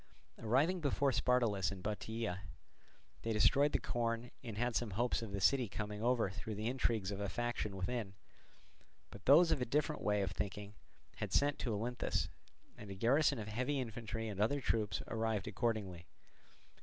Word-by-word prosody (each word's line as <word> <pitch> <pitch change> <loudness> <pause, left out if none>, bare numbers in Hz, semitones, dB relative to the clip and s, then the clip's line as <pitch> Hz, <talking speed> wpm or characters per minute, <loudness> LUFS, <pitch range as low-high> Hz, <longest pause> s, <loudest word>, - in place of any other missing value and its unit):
Arriving 140 +11 +2
before 140 -1 +2
Spartolus 115 -8 +2
in 95 -2 -7
Bottiaea, 110 -2 -3 0.8
they 115 - -2
destroyed 140 +7 +4
the - - +2
corn 115 0 -2
and 115 -4 -6
had 120 0 0
some 120 - 0
hopes 120 0 +1
of 115 -3 -6
the 100 - -2
city 125 +3 +3
coming 105 +1 -4
over 120 -4 +2
through 105 +2 -5
the 105 +2 -4
intrigues 115 -5 0
of 100 - -4
a 100 -1 -2
faction 120 -3 -2
within. 100 0 -3 1.0
But 100 -1 -12
those 165 +5 +7
of - - +2
a - - +3
different 150 +5 0
way 105 -1 +2
of 95 - -2
thinking 100 +2 -4 0.4
had - - -3
sent 145 0 +2
to 120 - -1
Olynthus; 120 +4 -1 0.5
and 105 - -10
a 95 - -5
garrison 140 +7 +3
of 105 -2 -5
heavy 125 +6 -1
infantry 115 -2 -4
and 100 -2 -3
other 140 +7 +2
troops 105 -7 0
arrived 110 -3 -1
accordingly. 100 -5 -2
115 Hz, 170 wpm, -36 LUFS, 105-125 Hz, 1.0 s, those